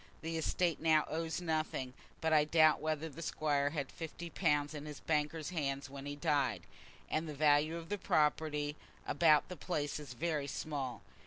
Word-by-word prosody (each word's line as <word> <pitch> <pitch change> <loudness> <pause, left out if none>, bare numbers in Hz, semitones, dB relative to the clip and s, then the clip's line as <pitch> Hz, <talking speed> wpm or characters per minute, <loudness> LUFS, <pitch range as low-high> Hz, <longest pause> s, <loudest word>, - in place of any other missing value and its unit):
The 165 0 -3
estate 165 +1 +1
now 155 -1 +4
owes 160 +2 -2
nothing; 155 -6 -1 0.3
but 160 0 +2
I 150 -1 +6
doubt 155 0 +5
whether 155 0 -1
the 160 +1 -9
Squire 145 -3 +1
had 145 -3 -3
fifty 170 +1 -7
pounds 145 0 +1
in 150 0 -6
his 150 -2 -7
banker's 150 +1 -1
hands 140 -5 -2
when 140 0 -7
he 145 - -4
died, 140 - +1 0.4
and 155 +1 -1
the 150 - -5
value 150 +2 +3
of 165 0 -8
the 205 - -2
property 150 -2 +1 0.3
about 155 -3 +4
the 180 - -7
place 150 -3 -2
is 145 -4 -8
very 150 +1 -1
small. 140 -5 -4
150 Hz, 175 wpm, -35 LUFS, 145-160 Hz, 0.4 s, I